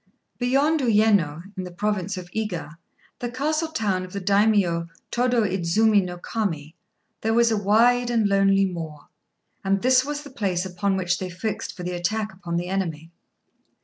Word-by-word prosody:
Beyond 275 +6 +2
Uyéno, 205 - +2
in 185 - -4
the 180 - -6
province 200 0 -2
of 175 -1 -8
Iga, 180 -7 -4 0.4
the 240 - -3
castle 305 +6 -1
town 205 -12 -1
of 185 - -10
the 200 - -2
Daimio 200 -4 +2 0.2
Tôdô 245 -3 +2
Idzumi 195 +3 +3
no 180 -1 -6
Kami, 165 -7 -3 0.5
there 225 +1 +2
is 235 -1 +4
a - - +3
wide 235 +4 +3
and 230 -3 +2
lonely 195 0 +4
moor; 165 -5 -6 0.5
and 195 0 +1
this 255 0 +5
was 295 +1 -4
the 285 - -11
place 190 -8 -1
upon 190 +2 -1
which 180 -1 0
they 185 - -4
fixed 210 +5 -4
for 180 - -6
the 180 - -3
attack 210 +5 -2
upon 175 -3 -4
the 175 +1 -2
enemy. 165 -4 -3
200 Hz, 170 wpm, -24 LUFS, 180-225 Hz, 0.5 s, this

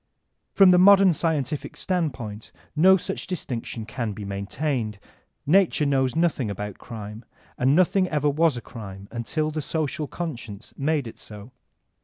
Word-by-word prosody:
From 195 -2 +7
the 180 - +6
modem 195 -1 +7
scientific 150 -3 -2
standpoint 135 - -3 0.2
no 190 +5 +6
such 190 +2 -5
distinction 120 - -4
can 115 -1 -4
be 105 0 -7
maintained. 110 +3 -3 0.5
Nature 170 -1 +3
knows 135 -2 +1
nothing 160 -8 +1
about 100 0 -6
crime, 110 -1 -8 0.3
and 130 +3 +2
nothing 185 +2 +3
ever 150 -1 0
was 150 -1 +2
a - - -5
crime 100 -5 -10
until 155 +7 -2
the 155 0 -3
social 155 0 -2
Conscience 120 - -7
made 145 -1 0
it 115 - -10
so. 105 +3 -10
140 Hz, 145 wpm, -24 LUFS, 110-165 Hz, 0.5 s, From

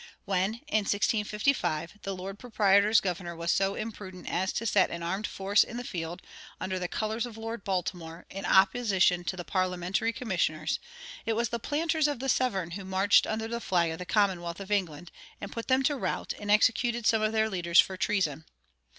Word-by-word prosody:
When, 195 +2 0
in 215 -7 +1
1655, 210 - 0
the 195 -1 -4
lord 195 +2 -7
proprietor's 210 -2 +4
governor 175 -2 -3
was 170 +1 -1
so 195 0 +1
imprudent 195 -5 -7
as 185 +2 0
to 230 - -2
set 205 -4 +3
an 170 0 -5
armed 190 +5 -2
force 195 +2 +3
in 235 - -8
the 245 - -4
field, 170 -4 -5 0.4
under 185 0 -2
the 180 - -2
colors 220 +5 -2
of 225 -2 -11
Lord 225 -1 -5
Baltimore, 175 -3 -3
in 195 +1 -6
opposition 190 -3 +3
to 185 - -3
the 175 - -4
parliamentary 185 +4 0
commissioners, 175 -10 -1 0.5
it 225 - +2
was 235 +1 0
the 235 -1 -3
planters 315 +4 +1
of 290 -2 -2
the 265 +2 -3
Severn 195 -10 +1
who 195 +3 -6
marched 190 +2 +3
under 220 +1 -2
the 235 +1 -4
flag 170 -5 +1
of 160 - -6
the 180 - -5
commonwealth 180 -5 +1
of 195 +1 -8
England, 175 -5 -1 0.3
and 200 - -7
put 230 - -6
them 260 0 +3
to 290 +2 +2
rout, 265 - -2
and 205 - -6
executed 230 +2 +3
some 220 0 +4
of 215 0 +1
their 220 0 +2
leaders 170 -4 +2
for 190 - +4
treason. 170 -6 0
195 Hz, 195 wpm, -29 LUFS, 180-225 Hz, 0.5 s, proprietor's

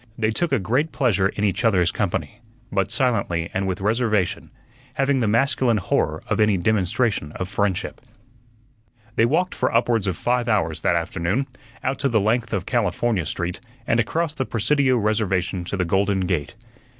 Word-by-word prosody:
They 110 -1 +1
took 170 +9 0
a 135 - +3
great 125 - 0
pleasure 100 -8 +2
in 100 - -4
each 105 +3 0
other's 95 -7 +3
company, 95 -3 -3 0.3
but 95 -2 0
silently 90 -10 0
and 95 +1 -1
with 95 +1 -3
reservation, 110 -3 0 0.5
having 135 0 +2
the 115 - +1
masculine 120 +1 +2
horror 90 - -1
of - - -1
any 105 -2 +4
demonstration 100 -3 0
of 95 - -4
friendship. 100 -2 -2 1.1
They 115 - +4
walked 175 +8 +1
for - - 0
upwards 115 -3 +1
of 90 -4 -1
five 125 0 0
hours 85 -9 0
that 85 - +2
afternoon, 85 +8 -1 0.4
out 130 +1 -1
the 125 -6 +2
length 115 +3 0
of 95 -3 -2
California 105 - 0
Street, 85 +3 -3 0.3
and 115 - +2
across 155 +8 0
the 135 - -2
Presidio 130 +3 +2
Reservation 100 -4 0
to 100 - -4
the 90 - 0
Golden 95 +2 +1
Gate. 90 -1 -2
105 Hz, 165 wpm, -23 LUFS, 95-120 Hz, 1.1 s, any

